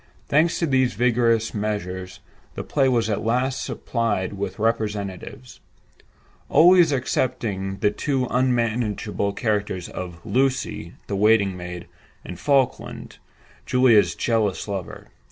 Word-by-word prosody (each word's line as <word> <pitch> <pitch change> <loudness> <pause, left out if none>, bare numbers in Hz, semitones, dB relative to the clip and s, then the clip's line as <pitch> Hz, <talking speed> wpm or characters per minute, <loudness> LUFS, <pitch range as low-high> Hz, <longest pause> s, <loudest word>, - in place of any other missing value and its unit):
Thanks 160 +4 +2
to 170 - 0
these 130 -6 +1
vigorous 115 -1 +2
measures, 95 -3 -4 0.3
the - - -4
play 135 -3 +1
was 115 -3 +1
at 105 -2 -2
last 125 +4 0
supplied 105 -6 -2
with 100 -1 -5
representatives—always 115 - 0
excepting 105 -7 -1
the 105 - +3
two 135 +3 -1
unmanageable 115 -5 0
characters 105 -5 -2
of 90 -2 -8
"Lucy" 130 -10 -1
the 100 - -3
waiting 100 -1 +3
maid, 90 -1 -7 0.4
and 90 - -8
"Falkland," 135 -1 -1 0.5
Julia's 125 -4 +4
jealous 110 -5 0
lover. 100 -3 -6
110 Hz, 110 wpm, -23 LUFS, 100-125 Hz, 0.5 s, Julia's